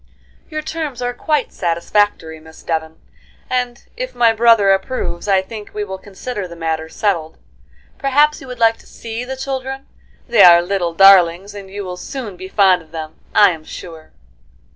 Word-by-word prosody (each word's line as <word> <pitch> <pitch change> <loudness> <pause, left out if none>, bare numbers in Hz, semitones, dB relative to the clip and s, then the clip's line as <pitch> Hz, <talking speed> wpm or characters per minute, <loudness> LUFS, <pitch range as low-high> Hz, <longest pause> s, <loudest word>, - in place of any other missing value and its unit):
"Your 310 -1 -4
terms 310 -5 -4
are 245 0 -2
quite 300 +1 -1
satisfactory, 170 -1 0
Miss 160 0 -16
Devon, 160 -1 -3 0.5
and 245 -1 -2
if - - -5
my 235 -2 +4
brother 225 -3 +5
approves, 195 -2 -2
I 190 -1 +3
think 210 0 -10
we 210 - -2
will 190 -2 -6
consider 205 +1 -6
the 170 - -11
matter 160 -1 -3
settled. 165 -5 -2 0.6
Perhaps 295 +2 +2
you - - -11
would 250 -1 -7
like 225 0 +3
to - - -20
see 230 +1 -7
the 265 +1 -6
children? 265 0 -5 0.4
They 235 -4 +4
are 175 -2 +9
little 175 -2 -2
darlings, 195 0 +5
and 200 -2 -9
you 200 +1 -6
will 180 -1 -6
soon 235 -3 -7
be 185 +1 -8
fond 190 -2 +3
of 160 - -19
them, 155 -1 -8 0.2
I 205 - +7
am 160 -2 -8
sure." 160 0 -10
200 Hz, 175 wpm, -18 LUFS, 170-245 Hz, 0.6 s, are